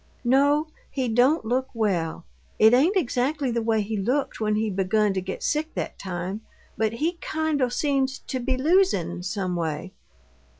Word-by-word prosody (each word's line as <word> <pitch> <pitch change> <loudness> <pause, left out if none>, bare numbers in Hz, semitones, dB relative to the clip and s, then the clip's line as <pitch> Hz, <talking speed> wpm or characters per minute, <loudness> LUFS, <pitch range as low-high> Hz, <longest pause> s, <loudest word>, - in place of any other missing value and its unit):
"No. 285 +5 +3 0.2
He 260 -3 -2
don't 245 +6 +3
look 255 +3 0
well. 175 -7 -1 0.3
It 220 +2 +6
ain't 320 +11 +4
exactly 270 -2 0
the 235 0 0
way 220 -1 +1
he 215 +2 -4
looked 250 +8 -1
when 215 -1 +1
he 220 +1 0
begun 195 +2 +1
to 190 - -1
get 190 +1 -6
sick 310 +1 -1
that - - -4
time, 185 +2 -4 0.3
but 220 0 0
he 330 +8 -2
kind 315 -2 -1
o' 250 - +2
seems 270 +1 0
to 260 - -5
be 255 +1 -1
losin', 260 - +2
some 190 -1 -2
way." 165 +2 -3
235 Hz, 170 wpm, -25 LUFS, 195-280 Hz, 0.3 s, It